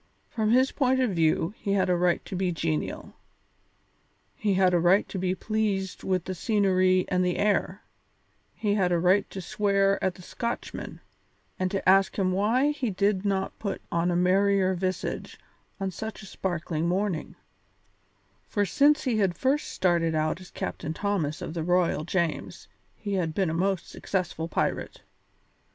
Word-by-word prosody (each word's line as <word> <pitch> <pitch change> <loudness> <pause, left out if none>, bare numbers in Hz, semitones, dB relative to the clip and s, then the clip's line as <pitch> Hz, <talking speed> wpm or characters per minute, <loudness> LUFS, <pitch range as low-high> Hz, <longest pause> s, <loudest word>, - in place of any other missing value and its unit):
From 220 -2 0
his 255 +4 +4
point 260 -2 +1
of 255 -4 +2
view 165 +1 +1
he 200 - -1
had 195 -2 +2
a 180 - +2
right 175 0 +1
to - - -6
be 185 0 0
genial; 80 - -3 1.2
he 205 -3 0
had 185 -1 +4
a 175 - +4
right 180 +4 +4
to 190 - -4
be 185 0 0
pleased 200 -2 -2
with 185 -2 0
the 185 - -3
scenery 185 -2 +2
and 180 -1 +2
the 180 -1 0
air; 200 -1 0 0.7
he 205 -2 0
had 190 -4 +1
a 175 - +3
right 185 +4 +3
to 195 - -7
swear 200 +1 +1
at 190 -2 0
the 180 - -13
Scotchman, 235 +5 -5 0.6
and 185 0 +1
to 195 -1 -3
ask 195 +1 +5
him 190 -2 +1
why 230 +9 +2
he 275 -5 -2
did 200 0 +1
not 195 -1 -1
put 200 -3 -3
on 170 +1 +1
a 175 - +1
merrier 190 +1 +3
visage 185 0 -3 0.4
on 195 -1 -2
such 220 +3 -7
a - - -9
sparkling 170 -4 -3
morning, 185 -2 -1 1.1
for 205 -1 0
since 290 - +3
he 240 -5 0
had 190 -4 +1
first 275 +3 +1
started 170 -3 +1
out 155 +3 0
as 185 - -12
Captain 155 +2 -5
Thomas 180 -7 -1
of - - -5
the 165 -2 -3
Royal 175 -3 +1
James 170 -2 -2 0.3
he 205 -2 -5
had 165 -5 -1
been 190 -5 +1
a - - -3
most 185 +1 0
successful 175 -4 -3
pirate. - - -2
190 Hz, 170 wpm, -27 LUFS, 175-205 Hz, 1.2 s, ask